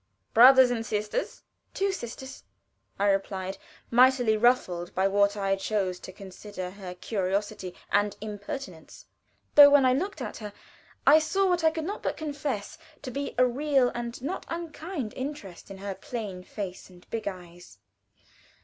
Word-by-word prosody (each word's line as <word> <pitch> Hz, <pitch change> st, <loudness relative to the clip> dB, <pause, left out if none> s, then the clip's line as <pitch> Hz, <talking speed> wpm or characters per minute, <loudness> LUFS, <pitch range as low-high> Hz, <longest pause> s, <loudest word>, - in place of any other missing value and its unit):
"Brothers 255 Hz, +2 st, +8 dB
and 230 Hz, -2 st, -1 dB
sisters?" 215 Hz, -, -3 dB, 0.3 s
"Two 395 Hz, 0 st, +1 dB
sisters," 265 Hz, -4 st, -7 dB, 0.5 s
I 200 Hz, -, +1 dB
replied, 195 Hz, -1 st, -3 dB, 0.3 s
mightily 245 Hz, -2 st, +5 dB
ruffled 215 Hz, -7 st, +1 dB
by 190 Hz, +1 st, +3 dB
what 200 Hz, +1 st, +2 dB
I 195 Hz, -1 st, +1 dB
chose 195 Hz, -2 st, -2 dB
to -, -, -9 dB
consider 190 Hz, 0 st, -8 dB
her 185 Hz, -2 st, -9 dB
curiosity 195 Hz, -1 st, -3 dB, 0.2 s
and 205 Hz, 0 st, +1 dB
impertinence; 210 Hz, -, -8 dB, 0.5 s
though, 290 Hz, -1 st, +10 dB
when 285 Hz, -2 st, +5 dB
I 255 Hz, -, +5 dB
looked 380 Hz, +10 st, -2 dB
at -, -, -5 dB
her, 210 Hz, -2 st, -8 dB, 0.5 s
I 300 Hz, +3 st, +8 dB
saw 385 Hz, +5 st, +1 dB
what 355 Hz, -2 st, +1 dB
I 320 Hz, -, +6 dB
could 320 Hz, -1 st, -4 dB
not 405 Hz, +4 st, -4 dB
but -, -, -2 dB
confess 285 Hz, -8 st, -4 dB, 0.2 s
to 255 Hz, -, -5 dB
be 280 Hz, +2 st, -4 dB
a 255 Hz, -, +6 dB
real, 265 Hz, 0 st, +2 dB
and 235 Hz, 0 st, -5 dB
not 330 Hz, +7 st, -3 dB
unkind, 330 Hz, -, -5 dB
interest 260 Hz, -11 st, -7 dB
in 195 Hz, -, -8 dB
her 195 Hz, 0 st, -5 dB
plain 205 Hz, -3 st, -6 dB
face 190 Hz, -1 st, -7 dB
and 180 Hz, -1 st, -17 dB
big 225 Hz, -2 st, -3 dB
eyes. 175 Hz, -, -9 dB
220 Hz, 155 wpm, -27 LUFS, 195-275 Hz, 0.5 s, though